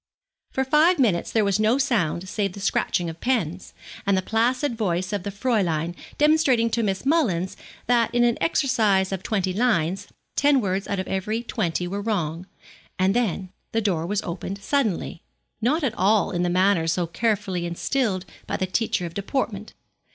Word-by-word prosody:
For 265 Hz, -, 0 dB
five 310 Hz, +6 st, +4 dB
minutes 210 Hz, -11 st, +1 dB
there 220 Hz, -2 st, +2 dB
was 200 Hz, +1 st, +1 dB
no 220 Hz, +4 st, +3 dB
sound 190 Hz, -, 0 dB
save 195 Hz, -1 st, -2 dB
the 200 Hz, -, -9 dB
scratching 180 Hz, -3 st, 0 dB
of 165 Hz, 0 st, -7 dB
pens, 190 Hz, -9 st, -1 dB, 0.3 s
and 200 Hz, -1 st, +2 dB
the 185 Hz, -, 0 dB
placid 240 Hz, +5 st, +1 dB
voice 185 Hz, -3 st, -1 dB
of 205 Hz, -, -1 dB
the 200 Hz, -, -4 dB
Fräulein 190 Hz, -7 st, 0 dB, 0.2 s
demonstrating 290 Hz, -7 st, +3 dB
to 230 Hz, -, +1 dB
Miss 195 Hz, +1 st, -1 dB
Mullins 220 Hz, -, +1 dB, 0.3 s
that 235 Hz, -1 st, +2 dB
in 240 Hz, 0 st, +3 dB
an 240 Hz, -1 st, +3 dB
exercise 215 Hz, -, +2 dB
of 190 Hz, -2 st, -3 dB
twenty 190 Hz, -3 st, -1 dB
lines, 195 Hz, -4 st, +1 dB, 0.3 s
ten 285 Hz, -1 st, +4 dB
words 195 Hz, -3 st, -1 dB
out 200 Hz, -, -2 dB
of 185 Hz, -, -3 dB
every 215 Hz, +5 st, -2 dB
twenty 180 Hz, -7 st, -2 dB
were 200 Hz, +3 st, -3 dB
wrong, 180 Hz, -5 st, -2 dB, 0.5 s
and 190 Hz, +2 st, +2 dB
then 195 Hz, -6 st, 0 dB, 0.2 s
the 225 Hz, -, +2 dB
door 175 Hz, -6 st, 0 dB
was 205 Hz, +1 st, -1 dB
opened 185 Hz, +3 st, -5 dB
suddenly 220 Hz, -, -1 dB, 0.4 s
not 295 Hz, +8 st, +1 dB
at 250 Hz, -6 st, +1 dB
all 205 Hz, +2 st, +2 dB
in 175 Hz, -2 st, -1 dB
the 175 Hz, -, +1 dB
manner 185 Hz, -2 st, +3 dB
so 175 Hz, +1 st, +1 dB
carefully 190 Hz, -2 st, -1 dB
instilled 190 Hz, +2 st, -1 dB, 0.2 s
by -, -, -2 dB
the 190 Hz, -, 0 dB
teacher 185 Hz, -1 st, -1 dB
of 170 Hz, -, -7 dB
deportment. 205 Hz, 0 st, -3 dB
200 Hz, 175 wpm, -24 LUFS, 185-235 Hz, 0.5 s, five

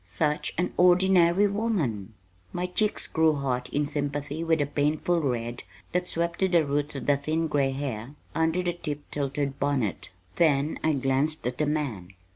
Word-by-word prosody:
Such 120 Hz, +12 st, -1 dB
an 180 Hz, -, 0 dB
ordinary 180 Hz, +1 st, +5 dB
woman!" 175 Hz, -, -1 dB, 0.4 s
My 180 Hz, -, -1 dB
cheeks 210 Hz, +4 st, 0 dB
grew 160 Hz, -1 st, +2 dB
hot 125 Hz, -3 st, -2 dB
in 145 Hz, +1 st, 0 dB
sympathy 145 Hz, +2 st, -3 dB
with 165 Hz, -1 st, +2 dB
the 145 Hz, -, +1 dB
painful 150 Hz, +4 st, 0 dB
red 120 Hz, -3 st, -2 dB, 0.3 s
that 180 Hz, +1 st, 0 dB
swept 170 Hz, 0 st, -1 dB
to 190 Hz, -, +3 dB
the 170 Hz, -4 st, +3 dB
roots 145 Hz, +1 st, -1 dB
of 135 Hz, -, -5 dB
the 145 Hz, -1 st, +3 dB
thin 155 Hz, +3 st, -1 dB
gray 145 Hz, -3 st, +1 dB
hair 135 Hz, -2 st, -4 dB, 0.2 s
under 160 Hz, +2 st, +1 dB
the 175 Hz, -1 st, 0 dB
tip 150 Hz, -4 st, -5 dB
tilted 140 Hz, -1 st, -2 dB
bonnet. 135 Hz, -8 st, -1 dB, 0.3 s
Then 150 Hz, -2 st, +2 dB
I 160 Hz, -, +3 dB
glanced 135 Hz, +3 st, 0 dB
at 125 Hz, 0 st, -3 dB
the 150 Hz, -, +1 dB
man. 125 Hz, -, -3 dB
150 Hz, 170 wpm, -27 LUFS, 135-170 Hz, 0.4 s, ordinary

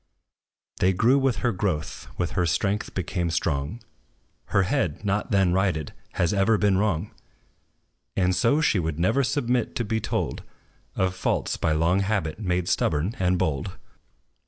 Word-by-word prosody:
They 95 Hz, +1 st, +3 dB
grew 120 Hz, +9 st, +4 dB
with 135 Hz, -3 st, +2 dB
her 120 Hz, -, +3 dB
growth, 90 Hz, -4 st, -3 dB
with 85 Hz, -3 st, -1 dB
her 90 Hz, -2 st, +1 dB
strength 100 Hz, +5 st, -1 dB
became 90 Hz, -1 st, -1 dB
strong: 80 Hz, +4 st, -2 dB, 0.6 s
Her 100 Hz, -, +2 dB
head, 90 Hz, 0 st, -1 dB
not 100 Hz, +1 st, 0 dB
then 95 Hz, -3 st, +3 dB
righted, 90 Hz, -6 st, 0 dB, 0.2 s
has 85 Hz, -, +1 dB
ever 100 Hz, +2 st, +3 dB
been 100 Hz, -2 st, +2 dB
wrong; 100 Hz, -2 st, 0 dB, 1.1 s
And 90 Hz, -1 st, +2 dB
so 115 Hz, -, +3 dB
she 115 Hz, -10 st, +3 dB
would 80 Hz, -3 st, -2 dB
never 110 Hz, +11 st, +2 dB
submit 125 Hz, -3 st, 0 dB
to 120 Hz, -, -1 dB
be 110 Hz, +2 st, 0 dB
told -, -, -2 dB, 0.5 s
Of 95 Hz, -1 st, +1 dB
faults, 95 Hz, -, -1 dB
by 80 Hz, -, 0 dB
long 85 Hz, +4 st, +2 dB
habit 95 Hz, -5 st, -1 dB
made 90 Hz, -4 st, -1 dB
stubborn 85 Hz, +10 st, 0 dB
and 90 Hz, -1 st, +2 dB
bold. 70 Hz, -5 st, -1 dB
95 Hz, 155 wpm, -25 LUFS, 85-105 Hz, 1.1 s, grew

